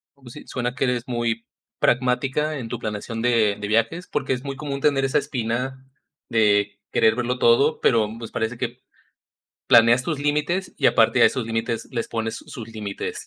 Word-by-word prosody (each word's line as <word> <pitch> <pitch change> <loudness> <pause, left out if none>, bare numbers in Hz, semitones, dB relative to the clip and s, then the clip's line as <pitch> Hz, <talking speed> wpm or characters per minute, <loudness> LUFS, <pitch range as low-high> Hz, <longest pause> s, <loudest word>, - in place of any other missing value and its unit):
Como 135 -3 -15
si 150 - -11
suena 125 0 -3
que 130 - 0
eres 125 -2 0
muy 120 -2 -2 0.3
pragmática 135 +5 +1
en 120 -4 -5
tu 120 - -4
planeación 110 +1 -4
de 115 -4 +3
de 105 - -4
viajes, 115 - 0
porque, 135 -2 -1
es 125 0 -4
muy 140 -1 -5
común 140 -1 -5
tener 135 -2 +2
esa 135 - +1
espina 130 -1 -3 0.4
de 105 -3 +2
querer 110 0 +3
verlo 125 +1 -2
todo, 140 +6 +4
pero 115 -3 +3
pues, 115 -1 -8
parece 110 +2 -2
que 125 +1 -4 0.9
planeas 115 +2 +6
tus 155 +1 -2
límites, 150 +6 -1
y - - +2
aparte - - +4
a - - +9
esos 130 - -1
límites, 115 0 -2
les 115 -2 -3
pones 115 -1 -3
sus 115 -2 -9
límites 105 -3 -6
120 Hz, 180 wpm, -23 LUFS, 115-135 Hz, 0.9 s, a